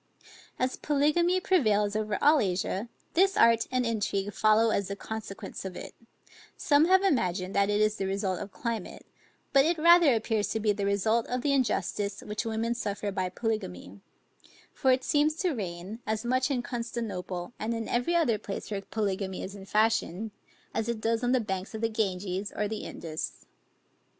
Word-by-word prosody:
As 255 +1 -1
polygamy 305 +5 +2
prevails 215 - +2
over 215 -1 -1
all 295 +1 +6
Asia, 195 +2 -1 0.2
this 385 +2 +3
art 230 0 +5
and 255 -1 +1
intrigue 205 -3 -1
follow 220 +1 +4
as 200 -3 0
the 200 - -4
consequence 215 -1 -7
of 190 -2 -6
it; - - -8 0.6
some 290 0 +4
have 375 +2 +5
imagined, 185 - +1
that 200 0 +2
it 205 0 +2
is 215 0 +2
the 195 - -2
result 195 -1 -1
of 200 - -7
climate, 230 -4 -5 0.5
but 275 -1 +7
it 330 +3 +1
rather 335 -4 +6
appears 220 -1 0
to 220 - -2
be 215 -1 +2
the 200 -1 -1
result 220 +3 +1
of 250 0 -2
the 285 - +2
injustice 205 -5 0
which 210 +2 -4
women 225 +1 -1
suffer 205 -3 -3
by 185 -1 -1
polygamy; 100 - -4 0.7
for 265 - +2
it 255 0 +2
seems 300 +1 +2
to 360 +2 0
reign, 190 -1 -5
as 220 +1 -1
much 255 +3 +1
in 255 -4 -1
Constantinople, 225 -6 -4
and 225 +2 -2
in 225 -1 -4
every 245 +9 0
other 245 -11 +2
place 200 +2 -6
where 200 -1 -2
polygamy 195 -3 -3
is 195 - -6
in 195 -1 -10
fashion, 215 -1 +1 0.4
as 225 +1 -1
it 235 -2 -2
does 225 +2 0
on 245 - +2
the 255 - +4
banks 195 -1 -4
of 220 - -5
the 225 - +1
Ganges, 195 -2 -2
or 210 - 0
the 215 +1 -5
Indus. 160 -1 -6
220 Hz, 180 wpm, -28 LUFS, 200-250 Hz, 0.7 s, but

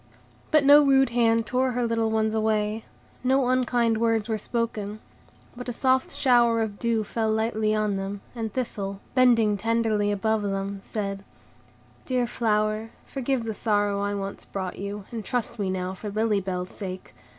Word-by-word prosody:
But 305 -2 +4
no 290 +1 +9
rude 270 -1 +4
hand 230 -1 +3
tore 255 +1 0
her 245 0 0
little 230 -1 +1
ones 220 0 +1
away, 215 0 0 0.4
no 260 0 +3
unkind 240 -3 +2
words 225 -2 +1
were 220 -1 -1
spoken; 215 -2 -3 0.6
but 245 +1 -6
a - - -3
soft 260 +2 +2
shower 240 -4 +4
of 215 -2 -2
dew 230 -2 +1
fell 220 +1 -1
lightly 220 -1 +1
on 210 -2 0
them, 195 +1 -4
and 225 -3 -4
Thistle, 200 -5 -3
bending 230 -5 +4
tenderly 220 -1 +1
above 220 +2 0
them, 195 0 -3
said,— 195 -2 -4 0.8
"Dear 255 -2 0
flower, 215 -2 0 0.2
forgive 265 -2 -2
the 225 -1 -3
sorrow 205 -2 0
I 205 0 -1
once 200 0 -5
brought 190 -2 -5
you, 200 0 -5
and 230 -2 -5
trust 235 +1 -2
me 195 -2 0
now 185 0 -2
for 205 +2 -6
Lily 215 0 +1
Bell's 180 -1 -3
sake. 185 -2 -7
220 Hz, 165 wpm, -26 LUFS, 205-235 Hz, 0.8 s, no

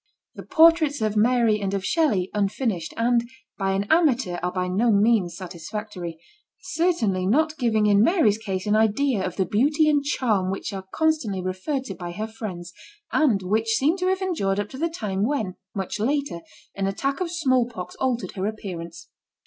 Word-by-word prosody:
The - - -9
portraits 320 -3 +4
of 215 -1 0
Mary 225 -1 +3
and 195 0 -1
of 190 -1 -3
Shelley, 210 - +1
unfinished, 200 -3 -1
and 235 0 +1 0.3
by 195 -1 0
an 195 +1 0
amateur, 265 - +2
are 180 +1 -1
by 180 0 -2
no 215 +6 +2
means 200 -4 +2
satisfactory; 180 0 -6 0.4
certainly 325 - 0
not 310 +8 +2
giving 220 -4 +2
in 205 -1 +5
Mary's 225 - +3
case 195 -3 -4
an 210 0 +2
idea 220 +1 +2
of 185 -2 -3
the 190 - +1
beauty 290 - +2
and 290 -2 +3
charm 220 -10 0
which 195 +2 -4
are 190 -1 -6
constantly 310 -12 0
referred 185 +10 -2
to 270 - -6
by 175 -2 -7
her 215 +4 -3
friends, 195 -6 -7 0.4
and 235 -11 +2
which 220 +4 +1
seem 295 +8 +2
to 365 -1 -1
have 380 +1 0
endured 205 - 0
up 205 0 -3
to 260 - -9
the 335 +2 0
time 205 - -3
when, 220 -7 -1 0.2
much 195 +1 -3
later, 280 -4 -1 0.3
an 195 -1 -2
attack 275 +8 -2
of 360 - -1
small 260 -8 +1
pox 185 -7 -7
altered 245 -8 -1
her 190 0 -3
appearance. 180 -6 -7
215 Hz, 180 wpm, -24 LUFS, 195-275 Hz, 0.4 s, in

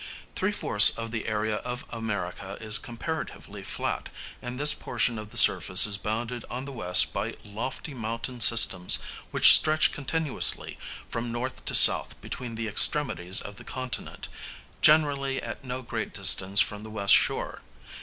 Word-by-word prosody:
Three - - -2
fourths - - +4
of 115 0 -8
the 115 -1 -6
area 110 -1 -3
of 125 +2 -8
America 100 -4 -7
is 110 0 +4
comparatively 155 +7 -8
flat, - - -5 0.3
and 125 +1 -8
this 150 +1 +3
portion 115 -3 -3
of 110 -1 -11
the - - -5
surface 95 - +5
is 100 -1 -2
bounded 115 +3 -6
on 125 +2 -7
the 140 - -9
west 90 -8 +3
by - - -5
lofty 120 +8 -8
mountain 115 +1 -7
systems 105 -6 +4 0.3
which - - +8
stretch 155 0 +3
continuously 150 +1 -2 0.3
from 115 0 -6
north 125 +2 -7
to - - +1
south - - +5
between 120 -2 -9
the 115 0 -6
extremities 105 -6 +3
of 100 0 -11
the - - -12
continent, 130 -2 -8 0.5
generally 140 -3 +1
at 115 +1 -9
no 130 0 -7
great 115 -3 -7
distance 95 0 +4
from 105 -1 -4
the 110 - -12
west 100 -2 +1
shore. - - -1
115 Hz, 155 wpm, -25 LUFS, 105-130 Hz, 0.5 s, which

